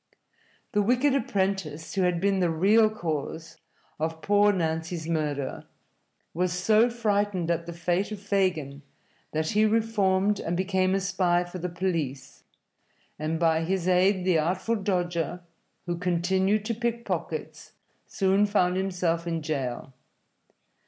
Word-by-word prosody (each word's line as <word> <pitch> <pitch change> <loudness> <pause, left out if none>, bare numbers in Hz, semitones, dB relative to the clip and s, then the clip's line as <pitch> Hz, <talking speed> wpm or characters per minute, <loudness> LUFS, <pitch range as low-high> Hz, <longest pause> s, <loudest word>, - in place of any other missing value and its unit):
The 210 -4 +2
wicked 250 +6 +2
apprentice, 190 - -1
who 195 - 0
had 180 -2 +1
been 195 +1 +1
the 175 -2 +2
real 205 +7 +4
cause 160 -5 -4 0.4
of 160 +1 -3
poor 205 0 +4
Nancy's 160 -2 -2
murder, 150 -4 -2 0.7
was 180 +1 0
so 215 +6 +3
frightened 205 -6 0
at 170 0 -2
the 170 - -5
fate 175 +4 -1
of 210 - -5
Fagin 185 -9 -1 0.5
that 155 0 -1
he 210 +1 +3
reformed 210 -3 +2
and 170 +1 -2
became 185 0 +1
a - - +1
spy 185 -2 +1
for 180 +1 -8
the 180 +1 -3
police, 155 -7 -3 0.8
and 155 +1 -2
by 165 -1 +3
his 185 +1 -1
aid 185 +1 +3
the 180 -4 +3
Artful 185 +8 0
Dodger, 175 -4 -1 0.4
who 175 -1 -3
continued 190 +4 +1
to 230 - -1
pick 235 +1 -2
pockets, - - -5 0.3
soon 195 +1 +2
found 185 -3 +2
himself 180 -3 -1
in 165 -2 -2
jail. 135 -4 -3
180 Hz, 140 wpm, -27 LUFS, 165-200 Hz, 0.8 s, real